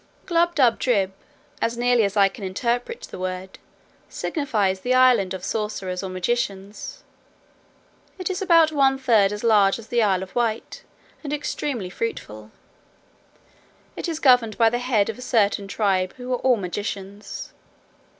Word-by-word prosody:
Glubbdubdrib, 260 - +2 0.5
as 230 +1 0
nearly 245 -1 +3
as 200 +1 -1
I 200 -1 +6
can 195 +1 -9
interpret 240 - -2
the - - -9
word, 185 0 -5 0.5
signifies 210 - -1
the 250 +6 0
island 250 -8 +4
of 185 - -8
sorcerers 200 -4 -3
or 190 - -5
magicians. 200 - -3 1.1
It 370 - -4
is 375 +2 -4
about 335 -4 +5
one 270 -3 +3
third 225 -7 +3
as 210 +1 -5
large 205 -4 +4
as 225 -1 -12
the 240 -1 +2
Isle 190 -3 +2
of 190 - -11
Wight, 230 -2 -2 0.4
and 290 - -5
extremely 285 -8 -3
fruitful: 110 - -5 1.5
it - - -4
is 320 -2 -3
governed 245 -5 +4
by 225 -1 +4
the 240 - -1
head 245 -5 +1
of 225 +1 -5
a - - -8
certain 205 -5 +1
tribe, 195 -3 0
who 250 0 -4
are - - +1
all 255 -2 +3
magicians. 200 +1 -6
225 Hz, 150 wpm, -23 LUFS, 195-255 Hz, 1.5 s, I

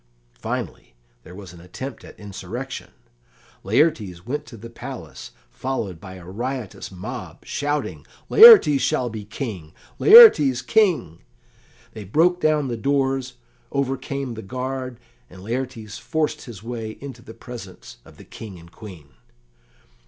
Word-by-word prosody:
Finally, - - -5 0.3
there 90 - -13
was 95 -3 -11
an 85 - -14
attempt 120 +9 -8
at - - -14
insurrection. 105 +6 -7 0.7
Laertes 105 - +1
went 145 +5 -4
to 115 - -11
the 115 +2 -10
palace, 115 - -9 0.2
followed 105 - -4
by 95 -2 -10
a 90 -2 -12
riotous 120 +3 -5
mob, 95 -1 -8
shouting, 145 +1 -3 0.2
"Laertes 425 - +9
shall 125 -1 0
be 110 -1 -6
King! 105 - -7 0.2
Laertes 150 - +8
King!" 170 - +1 0.7
They 110 - -8
broke 170 - +2
down 150 -2 +2
the 120 -2 -3
doors, 135 0 -1 0.4
overcame 135 -1 -3
the 110 - -7
guard, 130 +2 -5 0.3
and 90 +1 -13
Laertes 115 -2 -5
forced 155 -2 -2
his 110 -6 -11
way 115 -2 -6
into 140 -1 -9
the 110 - -13
presence 115 -7 -11
of - - -18
the - - -14
King 105 -5 -10
and 85 0 -16
Queen. 90 -11 -12
120 Hz, 135 wpm, -22 LUFS, 100-135 Hz, 0.7 s, Laertes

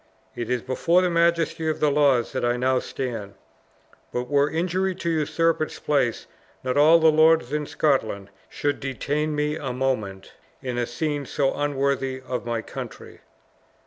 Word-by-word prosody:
It 120 - -4
is 125 -2 -1
before 170 +8 +2
the 180 - +1
majesty 170 -1 +1
of 155 - -2
the 150 -1 +3
laws 140 -5 +3
that - - -3
I 120 0 +1
now 130 +1 +2
stand; 115 -8 -5 0.8
but 125 0 -3
were 145 +2 +2
injury 185 +4 -1
to 170 - -3
usurp 165 +1 +1
its 155 - -3
place, 135 -6 0 0.4
not 130 -1 -1
all 155 +3 +7
the 160 -1 +5
lords 155 -3 +4
in 150 -1 -1
Scotland 110 -9 0 0.2
should 145 -1 -2
detain 145 +3 -2
me 150 +1 -1
a 135 -5 -4
moment 110 -7 -2 0.3
in 125 -2 -3
a 120 - -1
scene 145 +2 -3
so 135 -2 0
unworthy 140 -2 -1
of 130 -2 -5
my 115 -1 -2
country." - - -9
140 Hz, 165 wpm, -24 LUFS, 125-155 Hz, 0.8 s, all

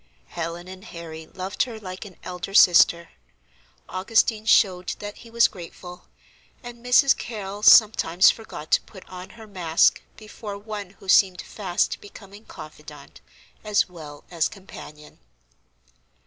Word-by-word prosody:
Helen 170 +1 -6
and 185 0 -11
Harry 160 -5 -10
loved 190 +2 -5
her 230 -3 -2
like 185 0 -8
an 190 -3 -12
elder 180 +2 -7
sister; 170 -2 +6 0.8
Augustine 215 +3 0
showed 185 -5 +3
that 205 0 -8
he 235 - -14
was 235 0 +4
grateful, 180 0 -12 0.6
and 240 -1 -11
Mrs. 265 +3 +5
Carrol 205 -3 -7
sometimes 205 -5 +6
forgot 220 -8 -10
to - - +4
put 190 -3 -15
on 185 0 -10
her 220 - -11
mask 175 -6 +2 0.2
before 215 -1 -9
one 205 -2 -7
who 195 - -16
seemed 185 -1 +4
fast 185 -4 -2
becoming 205 +1 -14
confidante 150 -2 -13 0.4
as 210 -1 +1
well 155 -5 -12
as 165 -3 +1
companion. 150 -6 -13
190 Hz, 135 wpm, -24 LUFS, 175-215 Hz, 0.8 s, sister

